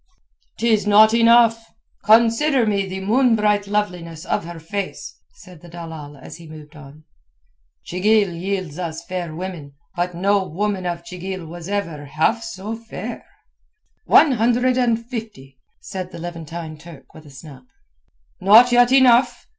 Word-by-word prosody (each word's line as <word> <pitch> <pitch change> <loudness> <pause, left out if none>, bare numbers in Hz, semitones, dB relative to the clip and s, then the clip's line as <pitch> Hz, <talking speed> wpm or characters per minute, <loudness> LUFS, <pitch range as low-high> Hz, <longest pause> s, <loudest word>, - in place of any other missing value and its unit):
"'Tis 220 -3 +1
not 215 +2 +6
enough. 230 0 +4 0.4
Consider 230 +5 +4
me 200 -2 0
the 190 0 -6
moon 235 +4 +2
bright 210 -1 +1
loveliness 180 -5 -3
of - - -2
her 170 -1 -8
face," 195 +4 -6 0.2
said 180 - -16
the 175 - -14
dalal 160 -4 -9
as 135 - -11
he 165 -2 -14
moved 155 0 -13
on. 150 +1 -14 0.8
"Chigil 200 +1 +1
yields 180 -2 -4
us 165 -1 -5
fair 175 -4 -5
women, 170 -5 -7 0.2
but 175 0 -2
no 200 +2 +1
woman 190 +1 -3
of 170 -1 -4
Chigil 185 0 -7
was 170 +2 -9
ever 170 -8 -4
half 160 +11 0
so 220 -1 -6
fair." 230 0 -8 0.8
"One 300 - +5
hundred 245 +2 +1
and 235 -2 0
fifty," 215 - -9 0.2
said 185 -2 -7
the - - -9
Levantine 165 -2 -8
Turk 160 -4 -15
with 155 -1 -14
a - - -14
snap. 135 -1 -13 0.8
"Not 220 +6 +6
yet 245 0 +4
enough. 260 -2 +4
190 Hz, 145 wpm, -20 LUFS, 165-225 Hz, 0.8 s, not